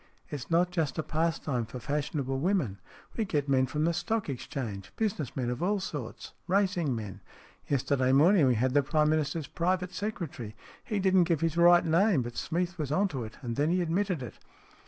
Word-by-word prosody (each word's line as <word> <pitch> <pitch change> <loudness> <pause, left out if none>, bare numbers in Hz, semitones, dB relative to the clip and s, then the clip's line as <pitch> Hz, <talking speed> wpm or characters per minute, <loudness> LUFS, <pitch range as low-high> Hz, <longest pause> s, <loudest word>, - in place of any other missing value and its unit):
It's 140 -3 -6
not 175 +2 +3
just 160 -6 -1
a 155 - 0
pastime 155 -8 -1
for 120 - -7
fashionable 140 +1 -2
women. 150 - 0 0.4
We 225 - 0
get 150 -8 -1
men 130 -1 +3
from 150 +4 -1
the 170 +1 +2
Stock 220 +2 -1
Exchange, 115 -6 -5
business 200 - -2
men 125 -2 -1
of 125 - -4
all 200 +3 +1
sorts, 145 -11 -6
racing 185 -7 +1
men. 105 -4 -6 0.5
Yesterday 130 -1 +1
morning 155 +3 +5
we 125 - +3
had 125 +3 +1
the 145 - +5
Prime 150 +2 +2
Minister's 155 0 0
private 180 +3 -1
secretary. 170 - -5 0.3
He 210 - -2
didn't 190 -2 +4
give 165 -3 0
his 165 -1 0
right 175 0 +6
name, 170 - +3
but 120 0 -7
Smeath 175 +1 -2
was 145 -3 -2
on 195 +6 +2
to 135 -7 -4
it, 110 0 -9
and 120 -2 -4
then 150 +2 +2
he 180 +1 +2
admitted 175 -2 -1
it." 120 - -9
155 Hz, 195 wpm, -29 LUFS, 130-180 Hz, 0.5 s, right